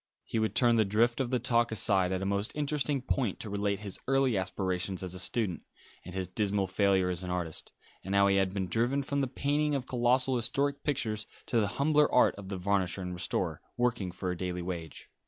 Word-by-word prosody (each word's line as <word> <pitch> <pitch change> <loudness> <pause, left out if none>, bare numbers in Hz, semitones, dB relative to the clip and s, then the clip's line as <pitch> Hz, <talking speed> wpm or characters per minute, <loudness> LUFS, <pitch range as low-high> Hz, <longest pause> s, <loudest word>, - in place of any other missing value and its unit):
He 115 - -2
would 110 0 0
turn 120 -2 +4
the 110 - +5
drift 115 +5 +2
of 125 - -1
the 125 - +2
talk 120 -1 +2
aside 95 -4 +3
at 95 0 -1
a - - -2
most 100 +1 -1
interesting 145 -2 -1
point 125 -6 -1
to 105 - -6
relate 100 0 -1
his 100 -3 -7
early 135 -3 +3
aspirations 95 0 -2
as 90 -1 -5
a 95 - -6
student, 95 -2 -1 0.4
and 90 +1 -9
his 95 -1 -2
dismal 100 +1 0
failure 95 -1 +2
as 90 +1 -4
an 90 - -5
artist, 90 -3 -3 0.3
and 95 +2 -2
how 100 0 +6
he 100 0 +3
had 95 -1 +2
been 95 -1 -2
driven 120 +9 +1
from 140 +1 -1
the 135 - +1
painting 145 +3 0
of 130 -2 -2
colossal 125 +1 +2
historical 140 +5 +1
pictures 110 -7 -1 0.2
to 120 - +1
the 105 - +2
humbler 150 +1 +3
art 125 - +5
of 100 -2 -9
the 100 - -3
varnisher 95 0 0
and 90 0 -4
restorer, 90 -2 -1 0.2
working 120 -6 0
for 90 +1 -3
a - - -3
daily 90 0 -3
wage. 85 -3 -6
100 Hz, 220 wpm, -30 LUFS, 95-125 Hz, 0.4 s, how